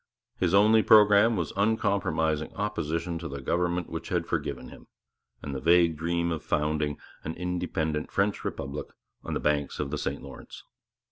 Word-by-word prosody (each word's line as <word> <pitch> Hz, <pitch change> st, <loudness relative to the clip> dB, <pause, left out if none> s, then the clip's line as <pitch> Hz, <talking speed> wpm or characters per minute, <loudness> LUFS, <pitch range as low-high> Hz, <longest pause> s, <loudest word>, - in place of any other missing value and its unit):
His 90 Hz, 0 st, +2 dB
only 110 Hz, +2 st, +6 dB
programme 105 Hz, +1 st, +6 dB
was 85 Hz, -5 st, -2 dB
uncompromising 100 Hz, -7 st, 0 dB
opposition 85 Hz, -5 st, -2 dB
to 85 Hz, -, -5 dB
the 70 Hz, 0 st, -6 dB
government 85 Hz, +5 st, -1 dB
which 80 Hz, -, -6 dB
had 85 Hz, -2 st, 0 dB
forgiven -, -, -3 dB
him, -, -, -14 dB, 0.6 s
and 70 Hz, -, -5 dB
the 65 Hz, -, -3 dB
vague 85 Hz, +1 st, +4 dB
dream 85 Hz, +2 st, -1 dB
of 80 Hz, -2 st, -3 dB
founding 75 Hz, -1 st, 0 dB, 0.3 s
an 80 Hz, -, -5 dB
independent 80 Hz, -3 st, -2 dB
French 100 Hz, +1 st, 0 dB
republic 70 Hz, +2 st, -5 dB, 0.4 s
on -, -, -4 dB
the -, -, -1 dB
banks 75 Hz, -1 st, -1 dB
of 70 Hz, -2 st, -2 dB
the 75 Hz, -, -2 dB
St -, -, -3 dB
Lawrence. 70 Hz, -, -11 dB
85 Hz, 160 wpm, -27 LUFS, 75-100 Hz, 0.6 s, only